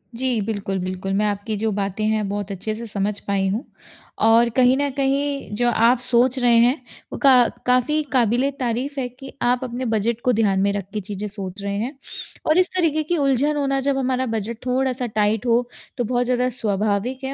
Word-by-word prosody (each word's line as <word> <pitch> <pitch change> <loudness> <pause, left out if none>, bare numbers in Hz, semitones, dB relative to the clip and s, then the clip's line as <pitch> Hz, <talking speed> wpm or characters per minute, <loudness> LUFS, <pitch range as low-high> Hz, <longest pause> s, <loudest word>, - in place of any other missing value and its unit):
जी। 250 -1 0
बिल्कुल, 200 -2 -3
बिल्कुल 185 +1 -3
मैं 205 +2 +1
आपकी 205 +1 -2
जो 220 +1 0
बातें 200 +1 -2
हैं 215 -1 0
बहुत 205 0 -4
अच्छे 205 +3 -3
से 230 +2 -7
समझ 200 0 -2
पाई 195 -1 -1
हूँ। 220 +7 -2 0.6
और 230 +1 +5
कहीं 255 0 +5
न 285 0 0
कहीं 275 -2 -1
जो 240 +2 +2
आप 235 +1 +3
सोच 250 +1 +2
रहे 240 -1 +4
हैं 240 +3 +5 0.4
वो - - -4
का 275 - +7 0.3
काफ़ी 255 +5 +2
कबिल-ए-तारीफ़ 255 +2 0
है 250 - -1
कि 255 +2 -12
आप 245 +1 +1
अपने 250 +1 -4
बजट 225 +1 0
को 250 - +4
ध्यान 205 -4 +2
में 200 - +2
रख 200 -2 -3
के 210 - -2
चीज़ें 205 +1 -5
सोच 200 -1 -7
रहे 200 0 -3
हैं। 255 +6 -4 0.5
और 310 - +3
इस 365 0 +4
तरीके 315 -4 +1
की 345 +3 -1
उलझन 280 +1 +2
होना 275 -1 0
जब 275 - +2
हमारा 260 -1 0
बजट 225 -1 -3
थोड़ा-सा 255 0 0
टाइट 215 +1 +1
हो 240 0 +2 0.3
तो 245 - 0
बहुत 245 +2 0
ज़्यादा 250 0 +1
स्वाभाविक 215 +5 -1
है 265 - -3
235 Hz, 200 wpm, -22 LUFS, 210-260 Hz, 0.6 s, का